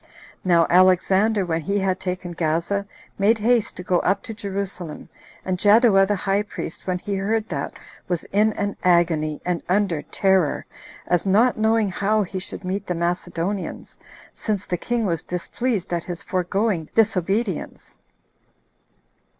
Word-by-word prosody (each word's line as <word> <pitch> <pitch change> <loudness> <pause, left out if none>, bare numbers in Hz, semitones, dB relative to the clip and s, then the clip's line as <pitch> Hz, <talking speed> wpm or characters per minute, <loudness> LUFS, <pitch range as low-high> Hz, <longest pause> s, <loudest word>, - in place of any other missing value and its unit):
Now 170 -2 +4
Alexander, 190 +3 +4
when 165 -1 -1
he 200 +6 -1
had 190 -2 0
taken 180 -1 -4
Gaza, 170 +5 -1 0.3
made 215 +3 +4
haste 230 +1 +1
to 180 - -6
go 180 -1 +2
up 195 +1 0
to 235 -3 -6
Jerusalem; 195 -6 -5 0.4
and 185 -1 -1
Jaddua 205 -2 +5
the 205 - +1
high 195 +1 0
priest, 205 -5 -6
when 180 -1 0
he 200 +3 -5
heard 215 +3 0
that, 140 -4 -3 0.3
was 175 -2 -1
in 210 +2 +4
an 205 -1 -3
agony, 165 -4 +2
and 175 -1 -1
under 185 -5 +1
terror, 190 -2 +1 0.4
as 175 +2 +1
not 225 +6 +4
knowing 220 -1 +2
how 210 +3 +1
he 190 0 -5
should 190 - -8
meet 195 +2 -3
the 180 - -1
Macedonians, 175 +2 -3 0.3
since 205 -3 -3
the 180 - -1
king 235 +5 -1
was 165 -4 0
displeased 185 +3 -3
at 170 -1 -2
his 175 -1 -6
foregoing 185 -2 -1
disobedience. 200 -2 0
190 Hz, 150 wpm, -23 LUFS, 175-205 Hz, 0.4 s, Jaddua